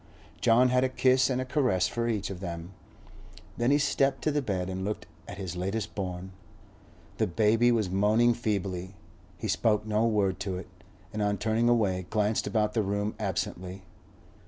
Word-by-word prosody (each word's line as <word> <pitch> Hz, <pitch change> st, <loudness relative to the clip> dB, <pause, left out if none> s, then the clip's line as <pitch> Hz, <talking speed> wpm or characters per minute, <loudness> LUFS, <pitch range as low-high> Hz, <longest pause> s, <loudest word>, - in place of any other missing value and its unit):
John 125 Hz, +3 st, +5 dB
had 125 Hz, 0 st, +3 dB
a 130 Hz, -, +2 dB
kiss 130 Hz, 0 st, +3 dB
and 130 Hz, -1 st, 0 dB
a 130 Hz, -, -2 dB
caress 125 Hz, -8 st, +1 dB
for 120 Hz, 0 st, -2 dB
each 105 Hz, -3 st, -2 dB
of 90 Hz, -, -6 dB
them; 85 Hz, -1 st, -6 dB, 0.9 s
then 120 Hz, +1 st, +2 dB
he 145 Hz, -, +5 dB
stepped 140 Hz, -1 st, +1 dB
to 155 Hz, -, +2 dB
the 145 Hz, 0 st, +1 dB
bed 95 Hz, -7 st, -2 dB
and 95 Hz, 0 st, -4 dB
looked 105 Hz, +2 st, -3 dB, 0.2 s
at -, -, -8 dB
his 95 Hz, -3 st, -5 dB
latest 100 Hz, +4 st, -3 dB
born. 95 Hz, -1 st, -5 dB, 0.9 s
The 110 Hz, -, +1 dB
baby 110 Hz, +5 st, +3 dB
was 110 Hz, -4 st, +1 dB
moaning 110 Hz, +5 st, +4 dB
feebly; 100 Hz, -5 st, -3 dB, 0.4 s
he 110 Hz, -, -4 dB
spoke 105 Hz, +1 st, +1 dB
no 110 Hz, +1 st, +2 dB
word 100 Hz, -4 st, +1 dB
to 95 Hz, -2 st, -3 dB
it, 90 Hz, -, -8 dB, 0.5 s
and 105 Hz, -, -2 dB
on 105 Hz, 0 st, +1 dB
turning 110 Hz, +4 st, +1 dB
away 95 Hz, -7 st, +1 dB
glanced 105 Hz, 0 st, +1 dB
about 105 Hz, 0 st, +1 dB
the 115 Hz, -, +2 dB
room 100 Hz, +1 st, -1 dB
absently. 95 Hz, -2 st, -3 dB
105 Hz, 180 wpm, -28 LUFS, 95-120 Hz, 0.9 s, John